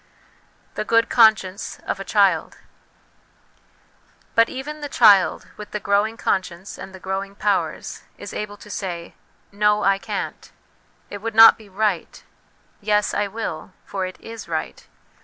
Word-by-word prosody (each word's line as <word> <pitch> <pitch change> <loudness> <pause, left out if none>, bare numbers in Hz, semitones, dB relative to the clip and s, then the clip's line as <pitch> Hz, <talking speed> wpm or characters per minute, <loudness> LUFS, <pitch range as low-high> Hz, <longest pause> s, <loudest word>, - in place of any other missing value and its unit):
The 215 - -3
Good 230 +1 +2
Conscience 215 -4 +3
of - - -3
a - - -4
Child. - - +2 1.8
But 230 0 +4
even 295 +3 -6
the 290 - -5
child, 200 -10 +4
with 210 0 -9
the 210 - -4
growing 205 +3 +1
conscience 185 0 -3
and 190 - -8
the 190 - -11
growing 195 +1 -4
powers, 205 -1 -2 0.2
is - - -8
able 205 -1 -5
to 210 - -14
say, 175 -5 -5 0.2
' - - -38
No, 210 0 +4
I 195 +1 +3
can't; - - -5 0.6
it 205 - -6
would 225 0 -4
not 225 0 +10
be 215 -2 -16
right'; 195 -2 -2 0.3
' - - -37
Yes, 210 0 +1
I 205 0 0
will; 195 -5 -6
for 190 -2 -3
it 185 - -11
is 225 0 -9
right.' - - -5
205 Hz, 155 wpm, -22 LUFS, 190-220 Hz, 1.8 s, not